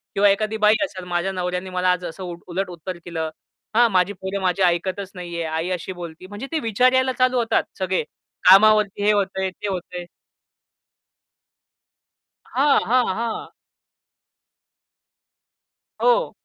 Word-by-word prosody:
किंवा 200 0 +5
एखादी 215 +2 0
बाई 210 0 +5
असेल, 190 -9 -9
माझ्या 175 +2 -1
नवऱ्याने 180 0 -3
मला 185 0 0
आज 180 0 -1
असं 175 +3 -7 0.2
उलट 185 +2 -2
उत्तर 175 +1 -7
दिलं. 160 -2 -3 0.5
हा 235 +1 +6
माझी 185 0 +2
पोरं 190 +1 -5
माझी 185 0 0
ऐकतच 185 +2 0
नाहीये. 170 -2 -5
आई 160 +2 -2
अशी 180 0 -3
बोलती. 170 +2 -8
म्हणजे 205 +7 -7
ते 320 - 0
विचार 250 +2 +2
यायला 260 0 +3
चालू 255 0 +3
होतात 230 -1 +2 0.2
सगळे 185 -2 0 0.5
कामावरती 205 0 +6
हे 210 - +5
होतंय, 195 -2 0
ते 185 +2 -7
होतंय. 180 -2 -5 2.5
हां, 275 +2 +4
हां, 250 0 +4
हां. 230 0 -3 2.5
हो. - - +3
190 Hz, 135 wpm, -22 LUFS, 180-215 Hz, 2.5 s, हा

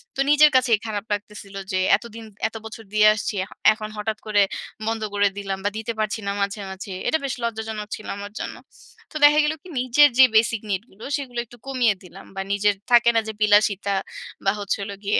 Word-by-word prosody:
তো - - -8
নিজের 295 +1 +7
কাছেই 245 -4 +4
খারাপ 210 -1 -4
লাগতেছিলো 205 -1 -6
যে 185 - 0 0.2
এতদিন 230 -1 -10 0.2
এতো 225 - -8
বছর 225 0 -9
দিয়ে 215 0 +6
আসছি। 215 0 -3
এ - - -6 0.3
এখন 215 0 -7
হঠাৎ 215 +1 -2
করে 210 -1 +3 0.5
বন্ধ 225 0 -1
করে 205 0 +3
দিলাম 195 -1 -3
বা - - +3
দিতে 225 +1 -3
পারছি 215 +1 -1
না 200 - +1
মাঝে, 200 +1 -1
মাঝে। 190 +1 -8 0.2
এটা 315 - +3
বেশ 270 - -2
লজ্জাজনক 220 -2 -4
ছিলো 215 - -10
আমার 205 0 -7
জন্য। - - -5 0.6
তো - - -18
দেখা 295 +1 +7
গেলো 305 +1 0
কি - - -15
নিজের 255 +4 +5
যে - - +11
basic 220 0 +3
need 195 0 -1
গুলো, 200 +4 -15
সেগুলো 250 -4 -5
একটু 240 +1 -16
কমিয়ে 245 -6 +2
দিলাম 185 +2 -13
বা 195 - -2
নিজের 205 0 +2 0.2
থাকে 240 -1 +6
না - - +5
যে 220 - -4
বিলাসিতা 205 -1 +3 0.5
বা 195 - +4
হচ্ছে 200 -1 -1
হলো 200 0 -6
গিয়ে 205 +1 +2
215 Hz, 210 wpm, -23 LUFS, 205-235 Hz, 0.6 s, যে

